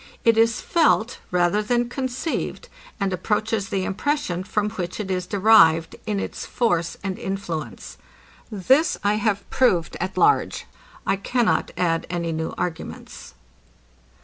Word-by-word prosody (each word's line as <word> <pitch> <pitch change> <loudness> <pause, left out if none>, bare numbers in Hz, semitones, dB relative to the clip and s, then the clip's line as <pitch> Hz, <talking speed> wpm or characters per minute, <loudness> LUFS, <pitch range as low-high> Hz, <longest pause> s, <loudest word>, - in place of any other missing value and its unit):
It 230 -1 +5
is 225 0 +3
felt, 250 -8 +2
rather 180 +3 +2
than 240 +3 0
conceived, 260 +5 -3 0.3
and 195 -2 0
approaches 210 +1 -1
the 190 -1 -1
impression, 200 - -1
from 210 +2 -1
which 185 -3 -5
it 195 -3 -3
is 180 -1 -2
derived, 185 -6 +5
in 210 -2 0
its - - -5
force 175 -9 0
and 190 -2 -3
influence. 160 - -5 0.5
This 260 - +2
I 205 +1 +2
have 210 -2 -1
proved 180 -11 +2
at 185 +2 -4
large. 425 +1 +2 0.4
I - - +1
cannot 240 +4 +1
add 165 -2 0
any 170 -1 -2
new 160 0 -3
arguments. 160 - -6
200 Hz, 135 wpm, -23 LUFS, 175-225 Hz, 0.5 s, It